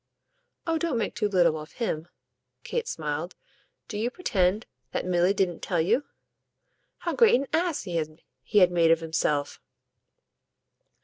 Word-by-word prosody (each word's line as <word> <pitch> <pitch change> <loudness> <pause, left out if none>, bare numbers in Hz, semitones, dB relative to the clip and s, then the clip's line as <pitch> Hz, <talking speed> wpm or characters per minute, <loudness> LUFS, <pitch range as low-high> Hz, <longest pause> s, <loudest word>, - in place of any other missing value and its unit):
"Oh 325 -1 0
don't 315 -6 0
make 225 - -1
too 210 -3 0
little 170 -5 +3
of 155 0 -10
him!" 170 -9 -3 0.6
Kate 475 0 -2
smiled. - - -3 0.5
"Do 210 - -4
you 230 +3 0
pretend 210 - 0 0.3
that - - -1
Milly 180 +1 +3
didn't 190 -4 0
tell 175 - -1
you?" 225 - +2 0.9
"How - - -3
great 465 -2 +6
an 270 +3 +1
ass 335 -2 +1
he 175 -3 -3 0.6
had 180 -3 +7
made 170 -2 +4
of 165 0 +5
himself?" 150 -3 -1
190 Hz, 140 wpm, -27 LUFS, 170-250 Hz, 0.9 s, had